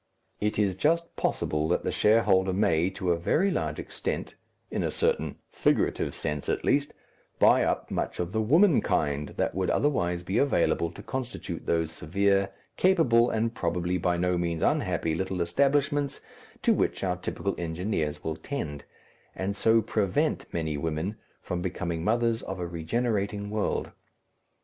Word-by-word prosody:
It 105 0 -1
is 100 -3 +2
just 165 - +1
possible 75 0 0
that 90 - +1
the - - -1
shareholder 95 -4 +3
may, 90 -3 +2
to 95 -1 -2
a 85 - +1
very 175 - +2
large - - -2
extent - - -4 0.4
in - - -1
a - - 0
certain 470 +1 0
figurative - - +1
sense, - - -3
at 425 -2 -1
least 145 0 +1 0.4
buy - - +5
up - - -1
much - - -2
of 90 0 -2
the 110 +1 0
womankind 110 - +2
that - - 0
would 95 +2 -1
otherwise 90 -12 +1
be 95 +5 0
available 85 -10 +2
to - - -10
constitute 125 -9 -5
those 80 -1 +1
severe, 100 +5 +1 0.3
capable, 135 -11 +4
and 115 +1 0
probably 90 0 -1
by 90 0 +1
no 90 0 +1
means 85 -2 -1
unhappy 80 - +1
little 95 +2 -2
establishments 140 - +1 0.4
to - - +5
which - - 0
our 90 -2 0
typical 100 +2 -3
engineers 80 -2 -2
will 80 -1 -2
tend, 75 - -5 0.5
and 95 +1 -2
so 115 +1 +3
prevent 100 -3 0
many 80 -3 -2
women 80 +6 -2 0.3
from 90 0 -3
becoming 85 -2 -3
mothers 115 +2 +1
of 95 0 -6
a 90 - -2
regenerating 100 +4 -2
world. 105 -1 -1
95 Hz, 155 wpm, -28 LUFS, 85-115 Hz, 0.5 s, buy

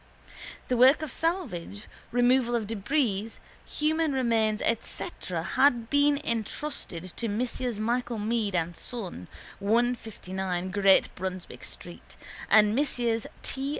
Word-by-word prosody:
The 250 - +1
work 260 +5 +6
of 305 - -4
salvage, 240 - -2 0.3
removal 245 0 +3
of 225 -2 0
débris, 225 0 -1 0.3
human 310 0 0
remains 225 -4 +2
etc 230 - -3
has 285 0 +4 0.2
been 285 0 +4
entrusted 220 - -3
to 235 - -1
Messrs 240 +1 -2
Michael 240 +1 -1
Meade 215 -2 -1
and 170 0 -1
Son, 185 - -6 0.3
159 195 -5 -1
Great 195 -1 +4
Brunswick 185 -1 -6
street, - - -9 0.3
and 210 -1 +6
Messrs 240 -4 0 0.2
T. 270 +1 -2
230 Hz, 115 wpm, -28 LUFS, 200-255 Hz, 0.3 s, work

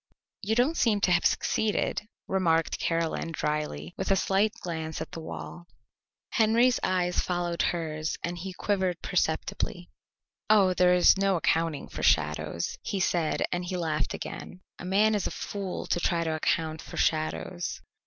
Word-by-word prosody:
"You 220 +2 0
don't 260 +8 +2
seem 220 -4 +3
to 185 - +3
have 175 0 +5
succeeded," 210 0 0 0.2
remarked 165 -4 +1
Caroline 165 0 -1
dryly, 150 - -3
with - - -2
a 195 - +5
slight 195 +2 +2
glance 160 -2 -4
at 160 - -6
the - - -6
wall. 170 +2 -8 0.6
Henry's 230 +3 +4
eyes 180 -1 +1
followed 175 -1 -1
hers 160 -2 -1
and 175 +1 -2
he 190 +2 -5
quivered 185 -2 -1
perceptibly. 175 +1 -1 0.6
"Oh, 200 -4 +5
there 180 0 +4
is 180 +2 +6
no 195 -1 +3
accounting 165 -3 0
for - - -7
shadows," 75 +2 +1
he 200 - -3
said, 175 -4 +1
and 175 0 -1
he 180 +1 -3
laughed 160 -3 -1
again. 180 - -7 0.2
"A - - -7
man 205 +4 +3
is 205 -3 0
a - - -1
fool 195 -3 -5
to - - 0
try 170 -1 +1
to 160 -1 -1
account 160 0 0
for - - -9
shadows." 160 +2 -1
175 Hz, 160 wpm, -28 LUFS, 160-195 Hz, 0.6 s, is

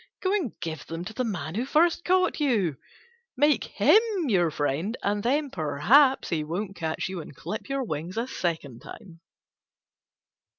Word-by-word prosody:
Go 375 +1 +1
and 355 - -2
give 160 -2 -5
them 165 +2 -5
to 220 - -7
the 255 - -1
man 170 - -4
who 225 +6 -1
first 330 +5 +2
caught 370 -1 +2
you; 215 - +1 0.6
make 295 +2 +3
him 435 - +5 0.3
your 175 -6 +3
friend, 155 - -2
and 205 +1 0
then 280 +5 0
perhaps 230 - +3
he 160 -3 -1
won't 190 +6 -4
catch 160 -2 -3
you 185 -2 -5
and 145 - -12
clip 215 - -6
your 275 -1 -1
wings 170 -1 -5
a 230 - 0
second 165 - -3
time." 170 +4 -12
200 Hz, 165 wpm, -26 LUFS, 160-265 Hz, 0.6 s, him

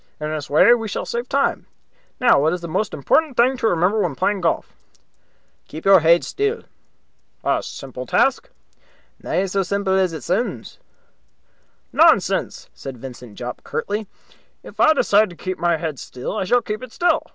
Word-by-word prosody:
In 150 0 -3
this 155 -2 -5
way 155 +11 +6
we 225 -2 -1
shall 205 - -4
save 240 +1 -4
time. 275 0 0 0.5
Now, 240 - +4
what 160 +3 +2
is 180 - -4
the 170 - -6
most 200 +6 -1
important 280 - +1
thing 255 +3 +4
to 225 - 0
remember 180 +3 +2
when 175 -9 -1
playing 200 +8 0
golf?" 170 - -1 0.9
"Keep 155 - -9
your 195 -1 +7
heid 170 +2 +4
still." 420 +3 -2 0.8
"A - - +1
simple - - -8
task." - - +1 0.7
"Na 190 - -1
sae 195 +1 -1
simple 195 +1 -1
as 190 -2 +2
it 160 -5 -7
soonds." - - -3 1.1
"Nonsense!" - - +3
said 135 -2 -8
Vincent 125 -3 -10
Jopp, 125 0 -6
curtly. 210 +1 -3 0.6
"If - - -13
I 315 - +6
decide 215 -7 +3
to 175 - -12
keep 185 0 -5
my 170 -1 +1
head 155 -5 -4
still, 125 +10 -6
I 205 - -1
shall 245 +5 +2
keep 215 +1 -4
it 255 -2 -9
still. 345 +2 +1
190 Hz, 175 wpm, -21 LUFS, 160-225 Hz, 1.1 s, your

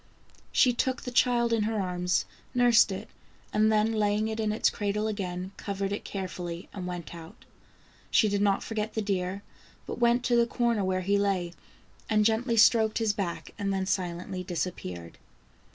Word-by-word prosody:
She 250 -3 +4
took 255 +1 -1
the 250 - -5
child 240 -1 +3
in 225 - +2
her 220 0 -1
arms, 180 -1 0 0.3
nursed 240 -3 +5
it, 195 +3 -5 0.5
and 215 +1 +4
then 215 +1 +3
laying 210 0 +1
it 220 0 -4
in 215 -1 0
its 215 - +2
cradle 210 0 -1
again, 185 -3 -3
covered 195 0 -3
it 205 - -4
carefully, 180 -3 -5
and 185 -3 -5
went 175 -2 -6
out. 165 -1 -12 0.6
She 220 - +4
did 200 -1 0
not 200 -1 +2
forget 215 -1 -3
the 220 - 0
deer, 195 0 -2 0.4
but - - -6
went 240 +1 +3
to 245 -1 +2
the 235 0 +4
corner 235 -4 0
where 185 0 0
he 200 +2 +1
lay 185 -4 0 0.6
and 215 -1 +3
gently 230 +2 +1
stroked 220 -1 +5
his 220 -2 +1
back 195 -4 -4
and 200 -1 -1
then 190 -1 -1
silently 185 0 -3
disappeared. 90 - -5
205 Hz, 175 wpm, -28 LUFS, 185-220 Hz, 0.6 s, nursed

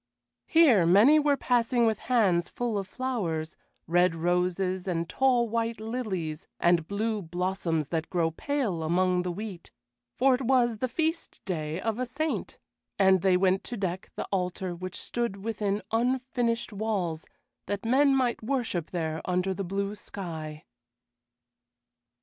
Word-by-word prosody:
Here 290 - +6
many 220 - +7
were 290 -1 +2
passing 240 -1 +2
with 220 -2 +1
hands 195 -9 +3
full 240 -3 -2
of 195 - -5
flowers, 190 -11 -3 0.3
red 175 +1 +3
roses 180 +2 0
and 170 -2 -1
tall 250 0 +2
white 230 0 -1
lilies 205 -9 -4
and 170 -2 +3
blue 215 +1 -1
blossoms 175 -3 -2
that 165 -1 -2
grow 170 -3 +1
pale 230 - -2
among 180 +3 +2
the 180 0 -2
wheat, 195 -2 -7 0.5
for 265 +1 +4
it 250 - 0
was 245 -3 +2
the 255 - 0
feast 320 +6 -2
day 160 -3 -3
of 225 +3 -2
a 255 - -1
saint, 300 +5 -3 0.4
and 190 -2 +5
they 185 -1 +4
went 190 +1 +2
to 240 - -5
deck 185 -2 -3
the - - -3
altar 180 -1 -2
which 185 +1 -6
stood 235 -5 -3
within 210 -2 -1
unfinished 240 -1 0
walls, 195 -6 -2 0.4
that 205 +1 -3
men 270 +4 +4
might 250 -3 +1
worship 225 - -2
there 160 -3 -3
under 180 +1 0
the 195 - -4
blue 200 +2 -2
sky. 160 -7 -7
195 Hz, 145 wpm, -28 LUFS, 175-240 Hz, 0.5 s, many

